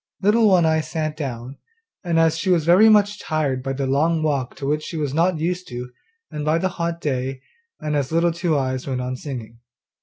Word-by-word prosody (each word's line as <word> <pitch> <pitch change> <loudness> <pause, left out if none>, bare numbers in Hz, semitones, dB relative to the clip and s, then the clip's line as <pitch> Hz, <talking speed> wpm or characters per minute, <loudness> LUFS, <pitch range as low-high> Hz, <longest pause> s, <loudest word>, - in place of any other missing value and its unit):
Little 215 +2 +4
One 185 -4 +4
eye 160 0 +2
sat 155 -1 -3
down, 130 -3 -6 0.5
and 170 -2 0
as 165 -1 +4
she 165 +3 -2
was 170 -4 +3
very 185 +6 +6
much 205 -1 +4
tired 145 -5 -1
by 135 +1 -3
the 135 0 -2
long 155 +4 +1
walk 140 -5 -1
to 140 - -6
which 150 +2 0
she 165 - -6
was 145 -3 -2
not 170 +2 +2
used, 180 +1 -3 0.6
and 150 - -4
by 155 +2 +2
the 185 +3 0
hot 170 -2 -3
day, 130 -3 -3 0.4
and 150 -1 -2
as 140 -1 -1
Little 170 +1 +2
Two 170 -2 0
eyes 130 -1 -2
went 130 -2 -2
on 125 0 -3
singing. 120 -4 -8
155 Hz, 210 wpm, -22 LUFS, 135-170 Hz, 0.6 s, very